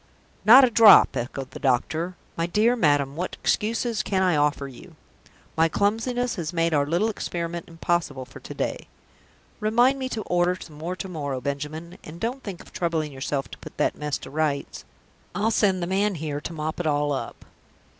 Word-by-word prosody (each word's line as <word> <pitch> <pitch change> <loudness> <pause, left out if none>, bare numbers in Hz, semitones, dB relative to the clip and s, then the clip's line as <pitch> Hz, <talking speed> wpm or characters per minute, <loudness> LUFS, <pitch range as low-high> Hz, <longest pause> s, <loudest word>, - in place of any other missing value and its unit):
"Not 250 +6 +10
a 245 - -1
drop!" 220 -1 +8
echoed 130 +2 -4
the - - -9
doctor. 155 +7 0 0.2
"My 165 0 -1
dear 215 +7 +3
madam, 145 - +2
what 180 +3 -4
excuses 225 +1 0
can 190 -2 0
I 180 -3 +3
offer 145 -1 +1
you? 130 -3 -13 0.6
My 165 0 +3
clumsiness 230 +6 0
has 160 -3 -3
made 165 -1 +1
our 145 -1 +2
little 170 +8 +1
experiment 170 -5 -4
impossible 165 -5 -2
for - - -13
to - - -9
day. - - -3 0.7
Remind 240 +5 +3
me 260 -1 -3
to 220 -4 -3
order 175 0 +1
some 150 -2 -11
more 175 +4 -3
to 190 - -6
morrow, 145 -7 -4
Benjamin, 150 +5 -5
and 160 +2 -10
don't 245 +6 -3
think 195 -7 -7
of - - -19
troubling 160 -3 -1
yourself 135 -1 -3
to - - -10
put - - -12
that - - +1
mess 150 -1 -3
to - - -11
rights. 150 -2 -2 0.5
I'll 215 +2 +1
send 190 -5 +2
the - - 0
man 195 +2 0
here 150 -2 -4
to - - -6
mop 155 0 -4
it 175 - -1
all 145 -1 +1
up. 135 - -6
170 Hz, 190 wpm, -25 LUFS, 150-205 Hz, 0.7 s, Not